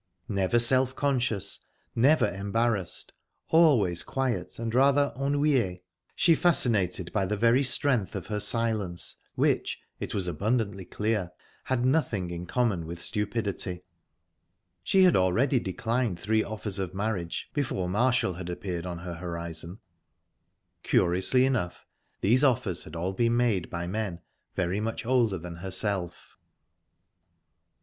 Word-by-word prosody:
Never 100 Hz, +2 st, +1 dB
self 130 Hz, +2 st, +3 dB
conscious, 120 Hz, -8 st, 0 dB, 0.3 s
never 140 Hz, +7 st, +4 dB
embarrassed, 100 Hz, 0 st, -1 dB, 0.4 s
always 125 Hz, -, +4 dB
quiet 135 Hz, -3 st, -2 dB
and 115 Hz, -1 st, -4 dB
rather 140 Hz, +2 st, +4 dB
ennuye, 135 Hz, -9 st, +1 dB, 0.3 s
she 170 Hz, -, +4 dB
fascinated 105 Hz, -, +1 dB
by 100 Hz, -3 st, +1 dB
the 105 Hz, +2 st, -1 dB
very 115 Hz, +4 st, +4 dB
strength 125 Hz, -6 st, +2 dB
of -, -, -4 dB
her 105 Hz, -1 st, -3 dB
silence, 110 Hz, -6 st, +1 dB, 0.2 s
which, -, -, +1 dB, 0.2 s
it -, -, -4 dB
was 95 Hz, -3 st, 0 dB
abundantly 100 Hz, +2 st, -1 dB
clear, 105 Hz, -3 st, -1 dB, 0.4 s
had 130 Hz, -2 st, 0 dB
nothing 115 Hz, -, 0 dB
in 85 Hz, +1 st, -6 dB
common 100 Hz, -8 st, 0 dB
with 85 Hz, +1 st, -7 dB
stupidity. 100 Hz, -3 st, -2 dB, 1.0 s
She 190 Hz, -1 st, +3 dB
had 180 Hz, -, +5 dB
already 115 Hz, +9 st, +3 dB
declined 115 Hz, 0 st, -2 dB
three 110 Hz, +3 st, +1 dB
offers 105 Hz, -2 st, -4 dB
of 95 Hz, -1 st, -4 dB
marriage, 100 Hz, -4 st, -3 dB
before 125 Hz, -11 st, -1 dB
Marshall 120 Hz, +1 st, +1 dB
had 90 Hz, 0 st, -7 dB
appeared 90 Hz, -1 st, -4 dB
on 90 Hz, -1 st, -5 dB
her 90 Hz, +1 st, -6 dB
horizon. 85 Hz, +2 st, -6 dB, 1.0 s
Curiously 95 Hz, +9 st, +3 dB
enough, 120 Hz, -10 st, -2 dB, 0.4 s
these 120 Hz, +8 st, +4 dB
offers 110 Hz, -, +2 dB
had -, -, -10 dB
all 90 Hz, +3 st, -2 dB
been 115 Hz, +3 st, +1 dB
made 115 Hz, -8 st, +1 dB
by 85 Hz, 0 st, -4 dB
men 95 Hz, -2 st, -3 dB, 0.3 s
very 95 Hz, +2 st, 0 dB
much 115 Hz, +2 st, -3 dB
older 120 Hz, -5 st, +2 dB
than 85 Hz, 0 st, -8 dB
herself. 95 Hz, -1 st, -3 dB
105 Hz, 130 wpm, -27 LUFS, 90-125 Hz, 1.0 s, had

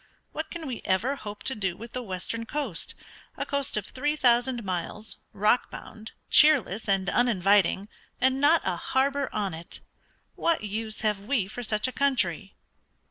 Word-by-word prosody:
What 315 Hz, -, -5 dB
can 340 Hz, -2 st, -7 dB
we 255 Hz, -5 st, -5 dB
ever 230 Hz, +9 st, +1 dB
hope 205 Hz, -5 st, -8 dB
to 265 Hz, -, +1 dB
do 190 Hz, -6 st, -2 dB
with 230 Hz, +1 st, -10 dB
the 250 Hz, -, -3 dB
western 225 Hz, +2 st, -4 dB
coast, 295 Hz, +3 st, 0 dB, 0.4 s
a -, -, -2 dB
coast 280 Hz, -5 st, -1 dB
of 210 Hz, -, -2 dB
three 290 Hz, +6 st, -2 dB
thousand 245 Hz, -2 st, +2 dB
miles, 190 Hz, +3 st, -3 dB
rock 210 Hz, +4 st, +2 dB
bound, 220 Hz, 0 st, -10 dB, 0.2 s
cheerless, 255 Hz, -9 st, +5 dB
and 195 Hz, -1 st, +1 dB
uninviting, 200 Hz, -3 st, +3 dB, 0.3 s
and 260 Hz, +1 st, +2 dB
not 315 Hz, +3 st, +5 dB
a 180 Hz, -2 st, 0 dB
harbor 275 Hz, +6 st, 0 dB
on 205 Hz, -4 st, -2 dB
it? 165 Hz, +1 st, -8 dB, 0.5 s
What 335 Hz, -8 st, +1 dB
use 215 Hz, +1 st, -4 dB
have 210 Hz, -2 st, +1 dB
we 230 Hz, -6 st, +1 dB
for 245 Hz, -, -7 dB
such 215 Hz, 0 st, 0 dB
a -, -, -3 dB
country?" 215 Hz, -, 0 dB
225 Hz, 165 wpm, -27 LUFS, 200-265 Hz, 0.5 s, cheerless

